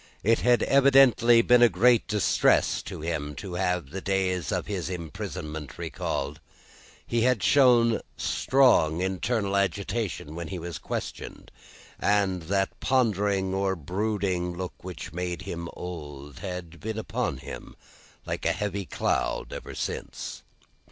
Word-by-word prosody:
It 115 +3 +3
had 120 -2 +3
evidently 135 -4 +6
been 125 0 +5
a 120 - +8
great 115 +5 +4
distress 105 -3 +2
to - - -8
him, 75 -3 -3
to 95 +1 -7
have 90 -5 -1
the 95 +3 -5
days 90 -5 0
of - - -1
his 95 -5 -3
imprisonment 80 -3 -6
recalled. 70 +3 -3 0.7
He 115 - 0
had 125 -3 +2
shown 120 -5 +5 0.2
strong 115 - +3
internal 100 +2 -1
agitation 100 -4 -1
when 85 0 -5
he 95 - -5
was 85 -3 -6
questioned, - - -6 0.5
and 100 -3 +2
that 95 -1 0
pondering 100 -6 +1
or 95 0 0
brooding 90 0 -2
look 90 0 -4
which 90 -2 -7
made 90 +1 -3
him 85 -3 -5
old, 75 -6 -8
had 90 -3 -6
been 110 0 -4
upon 110 - -2
him, - - -9 0.5
like - - -4
a - - +2
heavy 100 -2 -3
cloud, - - -1
ever - - -7
since. - - -5
95 Hz, 135 wpm, -27 LUFS, 85-110 Hz, 0.7 s, a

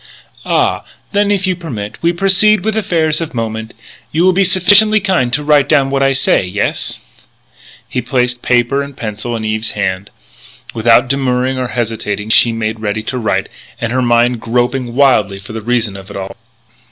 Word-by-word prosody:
"Ah! - - +1 0.3
Then, 205 0 +1
if 200 -2 +1
you 185 -1 0
permit, 115 - -7
we 170 - +2
proceed 195 +3 +3
with 220 -1 0
affairs 165 -7 0
of 165 -5 -5
moment. 110 -1 -4 0.4
You 165 +3 +1
will 185 - +4
be 195 +2 +3
sufficiently 200 +4 +5
kind 185 -12 0
to 145 +4 0
write 145 -1 +3
down 135 -1 +3
what 135 0 0
I 135 0 +3
say. 135 - +2
Yes?" 95 +3 -3 0.9
He 125 - -3
placed 125 -1 -1
paper 125 +3 +1
and 140 -1 -8
pencil 110 +2 -4
in 110 -1 -4
Eve's 110 0 -2
hand. 100 0 -2 0.6
Without 120 +2 +3
demurring 130 -1 0
or 130 - -2
hesitation 110 -3 -3
she 115 - +5
made 110 -1 -3
ready 110 0 -3
to 125 +3 -4
write, 110 - -1 0.3
her 120 +2 -1
mind 120 0 +2
groping 120 +1 -1
wildly 125 -8 +3
for 100 +3 -11
the 110 - -5
reason 115 -2 -1
of 95 0 -11
it 100 - -7
all. 95 0 -6
125 Hz, 175 wpm, -14 LUFS, 110-155 Hz, 0.9 s, sufficiently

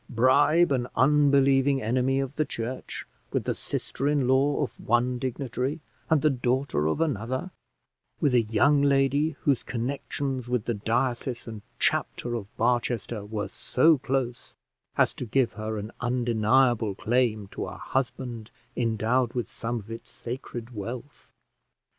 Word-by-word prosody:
bribe 145 +8 +4
an 125 -3 +1
unbelieving 140 0 +4
enemy 130 +3 +1
of 135 0 -3
the 155 - +2
church 125 -2 -5 0.3
with - - 0
the - - -1
sister 140 - -3
in 145 -3 +2
law 140 +3 +3
of 135 - -3
one 120 +2 +1
dignitary 130 +3 -2 0.3
and 155 -2 +3
the 155 - +5
daughter 125 - 0
of 80 - 0
another 130 - -1 0.7
with 140 - +2
a 120 - +5
young 120 +7 +3
lady 140 +2 +2
whose 140 -4 +2
connections 130 +1 -3
with 125 -3 0
the 120 - 0
diocese 120 +3 -1
and 110 -2 -7 0.2
chapter 120 - 0
of 110 -4 -3
Barchester 120 -2 0
were 105 0 -3
so 155 +3 +3
close 130 -2 -2 0.4
as - - +3
to - - -6
give 125 +1 +1
her 110 0 -4
an 105 +2 -5
undeniable 120 -2 +2
claim 110 -2 +1
to - - -5
a - - -7
husband 120 -3 -3 0.3
endowed 115 +1 +1
with 120 -2 -2
some 120 +1 -3
of 110 +1 -11
its 115 - -8
sacred 120 -1 -7
wealth! 120 +6 -7
125 Hz, 145 wpm, -27 LUFS, 115-135 Hz, 0.7 s, the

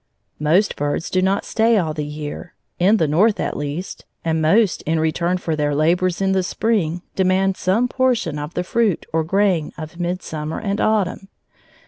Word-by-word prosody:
Most 165 +8 +2
birds 145 +3 -2
do 185 - +2
not 190 +2 +1
stay 225 0 +2
all 160 -5 0
the 150 - -3
year, 150 +3 -7 0.2
in 195 +5 +4
the 160 - +2
North, 200 +9 +3
at - - -2
least, 145 +5 -5 0.2
and 160 -1 +1
most, 180 +3 +3
in 160 0 +1
return 170 +3 0
for 165 -3 -2
their 145 -1 0
labors 175 +4 +1
in 195 0 +2
the 190 0 +2
spring, 180 -4 -1
demand 190 0 +2
some 210 +8 +1
portion 245 - 0
of 150 +3 -6
the 180 - 0
fruit 215 -2 0
or 160 0 +2
grain 185 -2 +1
of 155 +2 -8
midsummer 165 -3 -3
and 200 -1 -2
autumn. 200 -3 0
180 Hz, 175 wpm, -20 LUFS, 155-195 Hz, 0.2 s, in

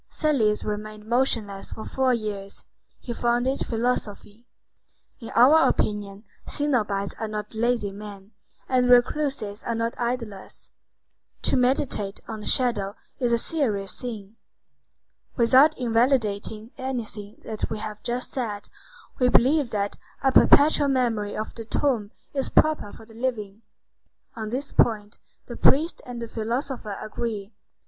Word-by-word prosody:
Thales 240 -9 +1
remained 210 0 -5
motionless 225 -5 0
for 220 - -8
four 265 -1 +1
years. 210 -4 -4 0.4
He 240 - -5
founded 240 +3 0
philosophy. 230 -1 -3 0.7
In 230 - -8
our 285 +7 +7
opinion, 205 -1 -2 0.2
cenobites 215 -9 0
are 220 - -2
not 210 0 -5
lazy 225 -2 0
men, 200 0 -10 0.4
and 250 -1 +2
recluses 245 -4 +2
are 230 - -2
not 230 +1 -1
idlers. 235 -5 -4 0.7
To - - +2
meditate 250 -6 0
on 220 - -5
the 210 - -7
Shadow 215 -6 +1 0.2
is 245 -2 +1
a 235 - +4
serious 225 - -2
thing. 220 -4 -7 1.0
Without 265 +6 +5
invalidating 225 -3 0
anything 220 -6 -5
that 215 -1 -3
we - - -3
have 210 0 -6
just 245 +1 -3
said, 215 -6 -4 0.5
we 250 -1 +4
believe 270 +2 +4
that 205 -2 -2 0.2
a 270 - +4
perpetual 290 +2 +6
memory 235 -6 0
of 215 - -4
the 230 - -7
tomb 225 -2 0 0.2
is 270 -2 -1
proper 310 -9 +2
for 225 - -13
the 225 - -17
living. 220 -4 -3 0.7
On 220 -1 -4
this 270 +5 -3
point, 210 -2 +1 0.3
the 240 - -8
priest 315 +8 +3
and 245 -1 -6
the 230 - -5
philosopher 230 -1 -3
agree. 215 -2 -4
230 Hz, 135 wpm, -25 LUFS, 210-255 Hz, 1.0 s, our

